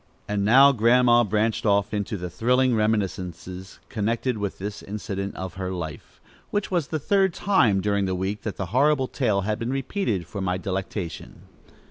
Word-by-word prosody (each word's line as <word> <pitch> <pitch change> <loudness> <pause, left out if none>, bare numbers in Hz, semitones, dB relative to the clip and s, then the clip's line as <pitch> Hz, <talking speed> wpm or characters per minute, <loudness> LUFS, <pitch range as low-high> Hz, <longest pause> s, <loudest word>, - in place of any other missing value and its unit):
And 105 -1 -1
now, 135 +7 +7
Grandma 120 0 +4
branched 110 +1 0
off 100 0 +2
into 105 +1 -2
the 90 -1 -5
thrilling 125 +7 +2
reminiscences 95 -4 -2
connected 115 +2 -1
with 100 -1 -3
this 105 +2 -6
incident 100 -1 -5
of 95 -2 -5
her 95 -1 -3
life, 80 -5 -7 0.3
which 205 -1 -2
was 170 -6 0
the 160 - -2
third 190 +3 +2
time 135 - +3
during 100 0 +1
the 95 -1 -1
week 95 +3 -3
that 105 - -5
the 95 -2 -4
horrible 140 0 +3
tale 110 -9 0
had 105 +3 -2
been 115 +1 -3
repeated 135 - -2
for 100 +4 -6
my 90 -1 0
delectation. 95 -1 -5
105 Hz, 170 wpm, -24 LUFS, 95-125 Hz, 0.3 s, now